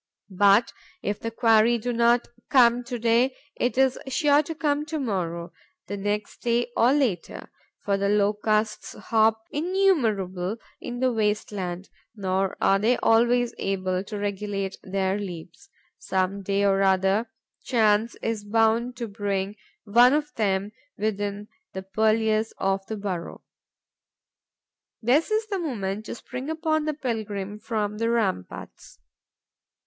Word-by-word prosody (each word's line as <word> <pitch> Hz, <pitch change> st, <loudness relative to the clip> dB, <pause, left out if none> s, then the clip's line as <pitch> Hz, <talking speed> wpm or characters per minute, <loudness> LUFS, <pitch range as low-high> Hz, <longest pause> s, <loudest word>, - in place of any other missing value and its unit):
But, 205 Hz, +4 st, +4 dB, 0.3 s
if 205 Hz, 0 st, -2 dB
the 230 Hz, -, -3 dB
quarry 230 Hz, 0 st, +4 dB
do 245 Hz, +2 st, -3 dB
not 235 Hz, +1 st, +3 dB, 0.2 s
come 245 Hz, -2 st, +5 dB
to 245 Hz, 0 st, -4 dB
day, 235 Hz, +3 st, +2 dB, 0.2 s
it 250 Hz, +1 st, -1 dB
is 265 Hz, -1 st, +3 dB
sure 290 Hz, +1 st, +3 dB
to 320 Hz, +2 st, -6 dB
come 295 Hz, -2 st, 0 dB
to 315 Hz, 0 st, -3 dB
morrow, 175 Hz, -8 st, -3 dB, 0.3 s
the 205 Hz, -, -5 dB
next 205 Hz, +1 st, -3 dB
day, 240 Hz, 0 st, 0 dB
or 240 Hz, +2 st, +4 dB
later, 255 Hz, -, -1 dB, 0.3 s
for 200 Hz, -1 st, +1 dB
the 200 Hz, 0 st, 0 dB
Locusts 210 Hz, +1 st, +1 dB
hop 220 Hz, 0 st, +1 dB
innumerable 230 Hz, -, +1 dB, 0.2 s
in 245 Hz, 0 st, -6 dB
the 255 Hz, -1 st, +2 dB
waste 210 Hz, -1 st, 0 dB
land, 185 Hz, -2 st, -5 dB, 0.3 s
nor 190 Hz, -1 st, -1 dB
are 195 Hz, -, +3 dB
they 230 Hz, +4 st, +2 dB
always 240 Hz, +1 st, +3 dB
able 185 Hz, -1 st, -1 dB
to 210 Hz, -, -6 dB
regulate 200 Hz, -1 st, -3 dB
their 190 Hz, +1 st, -1 dB
leaps. 185 Hz, -, -8 dB, 0.3 s
Some 190 Hz, +1 st, -1 dB
day 200 Hz, +1 st, 0 dB
or 195 Hz, 0 st, +3 dB
other, 195 Hz, +3 st, +2 dB, 0.3 s
chance 220 Hz, -1 st, +2 dB
is 225 Hz, -2 st, -2 dB
bound 225 Hz, +3 st, +1 dB
to 235 Hz, -2 st, -4 dB
bring 200 Hz, -1 st, -2 dB, 0.3 s
one 240 Hz, +5 st, +5 dB
of 295 Hz, 0 st, -1 dB
them 200 Hz, -1 st, 0 dB, 0.3 s
within 205 Hz, -1 st, -2 dB, 0.3 s
the 190 Hz, -, -5 dB
purlieus 220 Hz, +2 st, +1 dB
of 195 Hz, 0 st, 0 dB
the 220 Hz, -, -4 dB
burrow. 190 Hz, -4 st, -5 dB, 1.6 s
This 255 Hz, +8 st, +2 dB
is 435 Hz, +1 st, +1 dB
the 400 Hz, -3 st, -3 dB
moment 215 Hz, -, -3 dB
to -, -, -5 dB
spring 255 Hz, +4 st, -7 dB
upon 315 Hz, -1 st, 0 dB
the 305 Hz, -1 st, -1 dB
pilgrim 210 Hz, -6 st, -4 dB
from 210 Hz, -1 st, -3 dB
the 230 Hz, 0 st, +1 dB
ramparts. 210 Hz, -, -3 dB
215 Hz, 140 wpm, -25 LUFS, 195-240 Hz, 1.6 s, come